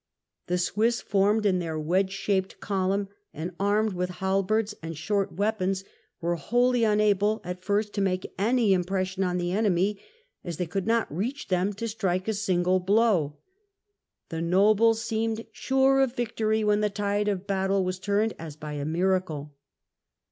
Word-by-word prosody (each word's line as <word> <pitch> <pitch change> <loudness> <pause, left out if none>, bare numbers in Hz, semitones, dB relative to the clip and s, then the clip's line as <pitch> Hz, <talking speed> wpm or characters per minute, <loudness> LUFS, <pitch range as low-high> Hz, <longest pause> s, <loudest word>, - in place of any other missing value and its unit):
The 180 0 +1
Swiss, 220 +6 +1
formed 205 +2 +2
in 185 -3 +3
their 165 -2 -3
wedge 185 +5 +1
shaped 195 -1 -1
column, 195 0 -1 0.3
and 165 +4 -4
armed 205 +1 +2
with 180 0 -2
halberds 195 +3 0
and 165 -1 -6
short 195 +5 -1
weapons, 195 -1 0 0.4
were 170 0 -1
wholly 245 - +2
unable 210 0 +3
at 180 +1 -6
first 205 +1 0
to 200 - -1
make 185 -1 -1
any 225 0 +3
impression 190 +1 -1
on 180 -1 0
the 175 0 -1
enemy, 200 0 +1 0.4
as 170 -3 -5
they 180 - -1
could 195 +4 -3
not 225 -9 +1
reach 245 - -3
them 185 +2 +1
to 230 +4 -4
strike 190 -4 -1
a 220 - +1
single 185 -3 +1
blow. 190 -6 +2 0.9
The 165 0 -4
nobles 215 +6 +3
seemed 225 0 -2
sure 265 0 +2
of 260 -2 +1
victory 220 -2 0
when 210 0 +2
the 210 - +2
tide 205 +1 -1
of 200 -2 -1
battle 195 -1 +1
was 185 0 -3
turned 205 +3 +1
as 160 -3 -7
by 150 -1 -7
a 145 -1 -3
miracle. 165 -3 -1
195 Hz, 160 wpm, -27 LUFS, 180-215 Hz, 0.9 s, in